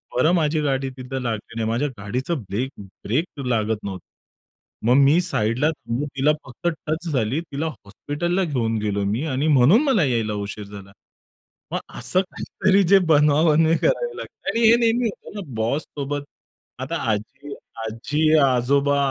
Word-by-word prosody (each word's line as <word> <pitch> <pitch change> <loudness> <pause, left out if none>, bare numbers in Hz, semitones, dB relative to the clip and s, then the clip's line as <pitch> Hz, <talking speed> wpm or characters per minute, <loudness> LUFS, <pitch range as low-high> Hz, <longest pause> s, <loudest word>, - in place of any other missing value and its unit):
बरं, 155 +7 +3
माझी 155 -2 +1
गाडी 135 -2 0
तिथे 130 +1 -5
लागली 115 -1 -4
नाही 115 -1 -1
माझ्या 120 +6 0
गाडीचा 125 - -3
ब्रेक 120 - -3
ब्रेक 120 - -4
लागत 110 -3 0
नव्हतं. 95 -3 -6 0.8
मग 120 - +5
मी 145 +5 +5
साइडला 125 -4 +1
थांबून 140 -2 -4
तिला 140 +3 +4
फक्त 130 +6 -6 0.2
टच 160 +3 -2
झाली. 130 +1 0
तिला 150 -2 -5
हॉस्पिटलला 155 - -3
घेऊन 120 -9 -1
गेलोय 100 -1 -1
मी 110 +7 -1
आणि 140 0 -1
म्हणून 150 - +5
मला 260 - +3
यायला 115 -6 0
उशीर 105 +1 -5
झाला." 100 -1 -11 0.8
मग - - -1 0.2
असं 185 - +2
काहीतरी 195 +1 0
जे 195 +3 +6
बनवाबनवी 155 +1 +4
करावी 485 - 0
लागते - - -7
आणि 230 0 +3
हे 235 - +7
नेहमी 235 +1 +2
होतं 205 - -11
ना 205 - -4
बॉससोबत. 140 +4 -2 0.6
आता - - -3 0.2
आजी 135 +7 -5 0.3
आजी 150 +8 0
अ, - - +5
आजोबा 140 +3 +2
140 Hz, 155 wpm, -22 LUFS, 115-160 Hz, 0.8 s, हे